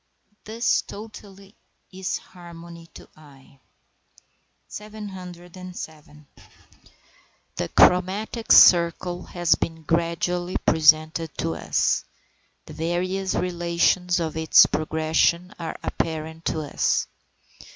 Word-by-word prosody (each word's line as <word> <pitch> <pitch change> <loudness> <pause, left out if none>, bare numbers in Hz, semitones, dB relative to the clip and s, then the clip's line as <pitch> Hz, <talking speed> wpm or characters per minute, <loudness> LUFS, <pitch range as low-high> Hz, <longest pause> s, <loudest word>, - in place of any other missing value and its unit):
This 230 +3 0
totality 200 -2 -12 0.4
is 190 +1 -3
harmony 170 -1 -13
to - - -11
the - - -22
eye. 140 -2 -19 1.1
707. 180 -7 -10 1.3
The - - -3
chromatic 195 +6 +2
circle 175 0 +5
has 175 -1 +1
been 165 -1 -4
gradually 170 +2 -1
presented 155 0 +3
to 80 - -2
us; - - 0 0.6
the - - -11
various 185 +3 -2
relations 175 0 0
of 160 -2 -3
its 160 0 +6
progression 160 +4 0
are 165 - -5
apparent 160 0 -4
to 160 - -1
us. 145 - 0
170 Hz, 90 wpm, -24 LUFS, 160-185 Hz, 1.3 s, its